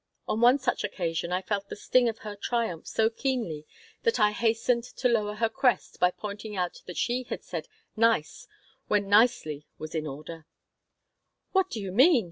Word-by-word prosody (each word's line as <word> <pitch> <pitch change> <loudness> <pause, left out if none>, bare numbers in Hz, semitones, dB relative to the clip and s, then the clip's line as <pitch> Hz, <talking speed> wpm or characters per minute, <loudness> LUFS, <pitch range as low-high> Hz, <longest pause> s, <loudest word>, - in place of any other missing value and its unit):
On 220 - -1
one 245 +3 +7
such 260 -3 -1
occasion 170 -4 -2
I 185 +1 0
felt 200 0 -2
the - - -5
sting 245 +3 +3
of 225 - -5
her 210 -1 -5
triumph 225 -5 -2
so 220 - +2
keenly 225 - -2 0.3
that 460 - +1
I 210 -1 +5
hastened 230 +2 +1
to 250 +1 -1
lower 210 -3 +1
her 225 +1 +2
crest 240 +2 0
by 180 - +5
pointing 210 +2 -7
out 180 -2 -2
that 180 - -7
she 245 +1 0
had - - -4
said - - -5 0.3
"nice" 225 -8 +1 0.4
where 210 - +3
"nicely" 200 -8 +2
was 155 0 -7
in 155 -1 -2
order 155 +3 -8 1.0
"What 380 -1 +2
do 225 - -4
you 195 -2 -4
mean?" 265 - +6
210 Hz, 180 wpm, -28 LUFS, 180-240 Hz, 1.0 s, one